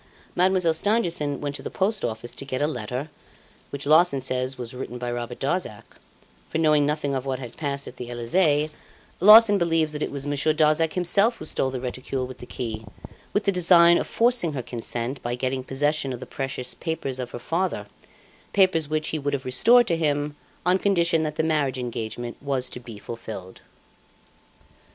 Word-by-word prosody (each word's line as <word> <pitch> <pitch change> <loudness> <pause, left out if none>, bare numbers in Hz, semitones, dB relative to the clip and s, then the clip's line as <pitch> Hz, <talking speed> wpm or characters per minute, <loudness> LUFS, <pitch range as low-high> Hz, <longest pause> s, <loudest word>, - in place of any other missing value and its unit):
Mademoiselle 180 -2 +3
Stangerson 165 -7 0
went 145 -1 -3
to - - -6
the - - -5
Post 195 +1 0
Office 115 +2 -4
to - - -7
get 130 -2 -3
a 145 - +2
letter, 125 +1 -4 0.6
which 140 0 -5
Larsan 155 -1 +4
says 130 0 -2
was 120 -1 -5
written 125 -1 -6
by 120 0 -4
Robert 120 0 -4
Darzac; 140 - -2 0.7
for - - -2
knowing 150 -2 +3
nothing 150 -2 -1
of 130 -1 -2
what 135 -1 -2
had 125 -3 -9
passed 140 -2 -3
at - - -10
the 125 -1 -7
Elysee, 150 +5 +1 0.5
Larsan 210 +1 +8
believes 165 -3 +1
that 150 - -5
it - - -1
was 140 -1 -4
Monsieur 145 +2 +1
Darzac 155 +1 +3
himself 200 +6 +3
who - - -8
stole 135 - 0
the 130 -1 -4
reticule 130 +1 -4
with 130 0 -10
the 125 - -10
key, 110 -3 -5 0.5
with 205 - 0
the 200 - +2
design 170 -1 +6
of - - -3
forcing 235 -9 +2
her 130 -3 -4
consent, 120 +2 -4
by 120 0 -2
getting 130 +1 -2
possession 145 +1 0
of 125 - -5
the - - -7
precious 135 -2 -4
papers 155 -6 -4
of 125 -1 -4
her - - -7
father 170 +9 -2 0.7
papers 185 -6 +3
which 155 0 -1
he 155 - -2
would 145 0 -1
have 135 - -6
restored 235 - +5
to 175 -7 +1
him 145 -2 -1 0.3
on 180 +1 +3
condition 170 -5 +2
that 155 -1 -2
the 160 - 0
marriage 150 -5 0
engagement 120 -1 -5
was 135 -3 -1
to - - -7
be 115 -3 -10
fulfilled. 105 -4 -8
145 Hz, 190 wpm, -24 LUFS, 125-165 Hz, 0.7 s, Larsan